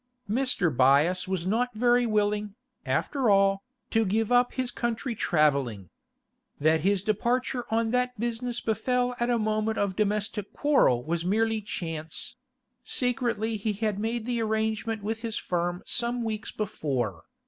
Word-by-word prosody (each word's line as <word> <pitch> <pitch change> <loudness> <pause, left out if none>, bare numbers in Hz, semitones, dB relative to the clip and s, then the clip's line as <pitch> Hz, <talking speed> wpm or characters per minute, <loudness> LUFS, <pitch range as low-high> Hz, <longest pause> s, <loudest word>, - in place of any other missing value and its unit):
Mr. 215 - +1
Byass 145 +9 +4
was 185 -2 -2
not 235 +5 0
very 240 +1 +3
willing, 210 -1 0 0.3
after 265 -5 +1
all, 195 -1 +4 0.3
to 225 -1 +3
give 220 +3 0
up 245 0 +4
his 255 -2 -1
country 235 +1 -2
travelling. 140 - +1 0.7
That 160 +2 +3
his 195 +2 +1
departure 240 +4 0
on 225 0 +1
that 250 -1 0
business 240 +1 -2
befell 250 +3 0
at 240 0 +1
a 240 - +3
moment 215 0 0
of 200 -2 0
domestic 210 0 -1
quarrel 200 - +3
was 165 +3 -2
merely 220 +4 +1
chance; 165 -5 -5 0.5
secretly 240 -4 0
he 210 +1 -1
had 210 -1 -1
made 225 +1 -2
the 240 -1 -1
arrangement 220 0 -1
with 220 +2 -2
his 230 -2 -3
firm 175 0 -2
some 240 0 -1
weeks 220 -1 -3
before. 130 - -3
215 Hz, 145 wpm, -27 LUFS, 190-235 Hz, 0.7 s, Byass